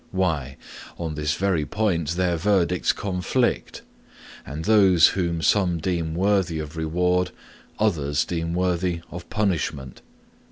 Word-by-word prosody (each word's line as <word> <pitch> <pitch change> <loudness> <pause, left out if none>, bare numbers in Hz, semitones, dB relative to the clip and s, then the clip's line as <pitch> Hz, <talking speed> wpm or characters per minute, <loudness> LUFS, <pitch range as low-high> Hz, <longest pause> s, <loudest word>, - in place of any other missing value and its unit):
Why, 80 -8 -1 0.4
on 80 -2 -4
this 75 +1 -1
very 90 -3 0
point 85 -4 -1
their 90 -1 +1
verdicts 90 -1 +2
conflict, 100 +6 -1 0.6
and 75 +3 -6
those 95 -6 +6
whom 85 -3 -2
some 90 0 +2
deem 85 -2 -2
worthy 95 -3 +1
of 75 0 -6
reward, 90 +3 +1 0.5
others 75 -9 +1
deem 85 -1 -3
worthy 90 -1 0
of 85 0 -8
punishment. 80 - -2
85 Hz, 120 wpm, -24 LUFS, 80-95 Hz, 0.6 s, those